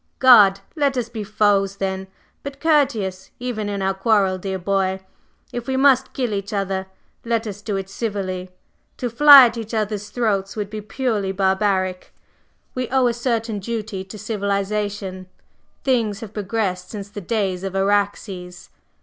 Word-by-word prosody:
"Good! 210 -7 +7
Let 280 -4 +1
us 235 -2 -2
be 225 -2 -5
foes 200 -1 +2
then, 190 -1 -3 0.3
but 280 0 -8
courteous, 250 - +1
even 230 -4 -3
in 200 -1 -3
our 195 0 +1
quarrel, 195 -2 +2
dear 190 0 -3
boy. 190 0 0 0.5
If 240 -1 -5
we 265 0 0
must 265 -1 +4
kill 245 -5 -2
each 200 0 -3
other, 195 -2 -2 0.4
let 230 -1 -1
us 205 -1 -6
do 205 -2 -2
it 195 -1 -4
civilly. 195 -3 -4 0.5
To 245 -2 -3
fly 280 +2 +10
at 235 0 -1
each 225 0 -5
other's 210 -1 -2
throats 205 -4 -1
would 205 -2 -4
be 215 0 -5
purely 215 -3 -2
barbaric. 190 -1 0 0.6
We 255 -2 -3
owe 260 -1 +3
a 240 - +2
certain 230 -3 -2
duty 215 -2 -4
to 195 +3 -10
civilization; 200 -2 -3 0.6
things 225 -6 0
have 220 -2 -8
progressed 200 -3 -2
since 205 -2 -7
the 205 - -7
days 190 -2 -1
of 195 -1 -4
Araxes." 195 -2 -1
205 Hz, 160 wpm, -21 LUFS, 195-230 Hz, 0.6 s, fly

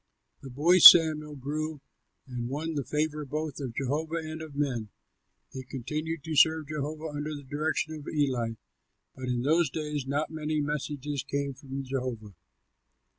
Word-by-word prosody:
The 135 - -9
boy 160 +8 +4
Samuel 155 -3 +9
grew 150 +3 -4 0.5
and 125 -2 -5
won 155 +4 -3
the 145 -2 -2
favor 150 +2 -2
both 150 +1 -4
of 130 -5 -5
Jehovah 150 +4 -2
and 160 -1 -5
of 155 -3 -9
men. 125 -7 -2 0.6
He 130 - -5
continued 150 +5 -5
to 160 0 -4
serve 160 0 +4
Jehovah 155 +1 -4
under 150 +1 -4
the 145 - -9
direction 155 +3 -2
of 150 -2 -9
Eli; 130 -7 0 0.6
but 130 - -7
in 120 -1 -1
those 160 +2 +3
days 150 -1 -4
not 145 +3 -1
many 155 -1 -2
messages 145 -1 -3
came 140 +1 -3
from 135 0 -7
Jehovah. 125 -6 -4
145 Hz, 155 wpm, -28 LUFS, 135-155 Hz, 0.6 s, Samuel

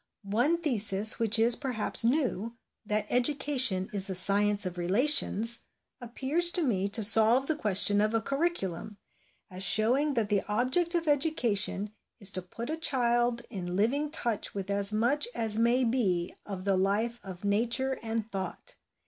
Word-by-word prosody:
One 240 +12 0
thesis, 220 - +2
which 225 -1 +3
is, 230 +1 +3
perhaps, 250 -5 +1
new, 235 -4 -2 0.3
that 210 0 -2
Educa 275 +3 0
tion 190 -7 +3
is 195 -2 -2
the 190 - -5
Science 205 +2 +1
of 180 -1 -6
Relations, 230 - +3 0.4
appears 270 +8 0
to 355 - +3
me 200 -7 -1
to 220 +2 0
solve 225 +5 +5
the 315 - -1
question 205 -5 +1
of 215 +2 -1
a - - +2
curriculum, 225 - -4 0.5
as 185 0 -8
showing 255 +9 +3
that 220 -3 -1
the 205 -2 +1
object 260 - 0
of 335 -1 -2
education 235 -9 0 0.3
is 200 -1 -1
to 185 - -2
put 230 - -8
a 320 - -4
child 240 -5 0
in 180 -4 -6
living 270 +9 -1
touch 235 -11 -2
with 195 0 -5
as 200 0 +3
much 240 - 0
as 220 -1 0
may 240 +3 +1
be 200 -8 -1
of 195 -2 -7
the 195 -1 +1
life 215 +5 -2
of 185 -1 -11
Nature 235 +6 0
and 225 0 -3
of - - -18
thought. 190 -2 -7
225 Hz, 165 wpm, -28 LUFS, 200-260 Hz, 0.5 s, solve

